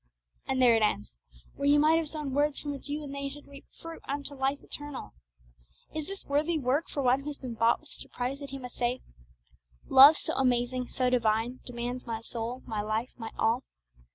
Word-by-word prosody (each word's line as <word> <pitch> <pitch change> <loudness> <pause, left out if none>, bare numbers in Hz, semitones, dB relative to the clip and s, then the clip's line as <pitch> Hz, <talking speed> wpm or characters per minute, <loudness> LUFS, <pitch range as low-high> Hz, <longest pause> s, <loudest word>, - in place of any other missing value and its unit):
And 265 -1 0
there 245 -2 +7
it 225 - +2
ends, 105 - 0 0.3
when 280 0 0
you 290 0 +6
might 315 +2 +5
have 320 -2 -3
sown 300 -4 -4
words 290 +1 +1
from 290 - -4
which 285 +1 -8
you 300 +1 -3
and 280 -1 -7
they 280 0 -3
should 290 +1 -10
reap 280 0 -13
fruit 330 0 -8
unto 285 +1 -3
life 270 +1 0
eternal. 290 -2 -7 0.8
Is 310 -1 -4
this 390 0 -7
worthy 300 +4 +1
work 280 +3 0
for 280 - -2
one 255 +1 +4
who 275 - -9
has 295 -1 -4
been 250 -3 -6
bought 230 +1 +3
with - - -15
such - - -9
a - - -21
price 255 +3 -3
that 280 -1 -7
he 275 - -5
must 250 -2 -9
say, 245 +1 0 0.9
'Love 280 +4 +9
so - - -2
amazing, 250 -1 +1
so 255 -1 0
divine, 230 +1 +1
Demands 245 0 -4
my 225 -1 -2
soul, 230 +2 -5
my 215 -2 -2
life, 215 +4 -2
my 225 -1 -5
all'? 230 +3 +2
265 Hz, 215 wpm, -29 LUFS, 240-290 Hz, 0.9 s, Love